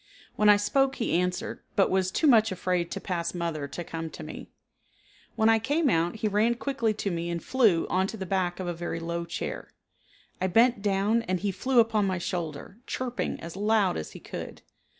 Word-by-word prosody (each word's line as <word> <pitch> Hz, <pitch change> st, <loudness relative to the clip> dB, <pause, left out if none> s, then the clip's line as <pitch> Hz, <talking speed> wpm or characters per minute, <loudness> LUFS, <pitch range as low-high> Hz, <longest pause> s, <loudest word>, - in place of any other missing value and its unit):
When 210 Hz, 0 st, +4 dB
I 205 Hz, -, +8 dB
spoke 270 Hz, +6 st, +1 dB
he 230 Hz, -, -1 dB
answered, 180 Hz, +1 st, -1 dB, 0.2 s
but 195 Hz, -, +3 dB
was 190 Hz, -1 st, +2 dB
too 315 Hz, -, 0 dB
much 225 Hz, -6 st, +5 dB
afraid 180 Hz, -1 st, -1 dB
to -, -, -4 dB
pass 170 Hz, -1 st, -3 dB
mother 165 Hz, -4 st, -2 dB
to 175 Hz, +5 st, -6 dB
come 165 Hz, 0 st, -5 dB
to -, -, -9 dB
me. -, -, -8 dB, 0.9 s
When 220 Hz, -1 st, +3 dB
I 225 Hz, 0 st, +5 dB
came 290 Hz, +4 st, +1 dB
out 170 Hz, +2 st, +1 dB
he 220 Hz, 0 st, -1 dB
ran 215 Hz, +3 st, +2 dB
quickly 240 Hz, -3 st, -1 dB
to 200 Hz, -1 st, -2 dB
me 170 Hz, 0 st, -3 dB
and 170 Hz, -1 st, -3 dB
flew 220 Hz, -11 st, +3 dB
onto 190 Hz, +4 st, 0 dB
the 190 Hz, -, -4 dB
back 180 Hz, -1 st, -1 dB
of 185 Hz, -, -3 dB
a 175 Hz, -, -2 dB
very 170 Hz, 0 st, -4 dB
low 170 Hz, +1 st, -3 dB
chair. 170 Hz, -, -5 dB, 0.7 s
I 185 Hz, -, +2 dB
bent 230 Hz, +3 st, +4 dB
down 205 Hz, +3 st, +2 dB
and 185 Hz, -4 st, -2 dB
he 200 Hz, 0 st, 0 dB
flew 255 Hz, +6 st, +2 dB
up 225 Hz, 0 st, +3 dB
on 210 Hz, -2 st, +2 dB
my 185 Hz, -1 st, 0 dB
shoulder, 175 Hz, +2 st, -5 dB
chirping 250 Hz, -1 st, -3 dB
as 170 Hz, +1 st, -7 dB
loud 205 Hz, -2 st, +2 dB
as 80 Hz, -, -5 dB
he -, -, -9 dB
could. -, -, -8 dB
190 Hz, 210 wpm, -27 LUFS, 175-225 Hz, 0.9 s, I